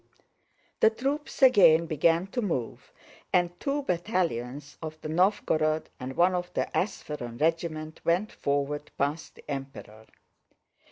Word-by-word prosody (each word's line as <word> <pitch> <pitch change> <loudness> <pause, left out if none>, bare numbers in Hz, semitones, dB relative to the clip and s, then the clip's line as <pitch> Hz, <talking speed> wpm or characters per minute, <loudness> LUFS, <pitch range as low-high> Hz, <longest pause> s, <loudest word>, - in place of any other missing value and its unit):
The 220 - +6
troops 275 +5 -3
again 175 -10 +7
began 165 +3 +2
to 245 - -1
move, 160 - -3 0.4
and 175 -1 +1
two 285 +1 -1
battalions 155 - -2
of 155 -1 -6
the 155 - -5
Nóvgorod 160 -3 +1
and 130 +1 -6
one 180 +2 +4
of 180 0 -3
the - - 0
Ápsheron 150 - -3
regiment 155 0 -1
went 180 +6 +1
forward 145 +1 -2
past 145 +3 -2
the - - -16
Emperor. 135 -6 -7
160 Hz, 125 wpm, -28 LUFS, 145-180 Hz, 0.4 s, again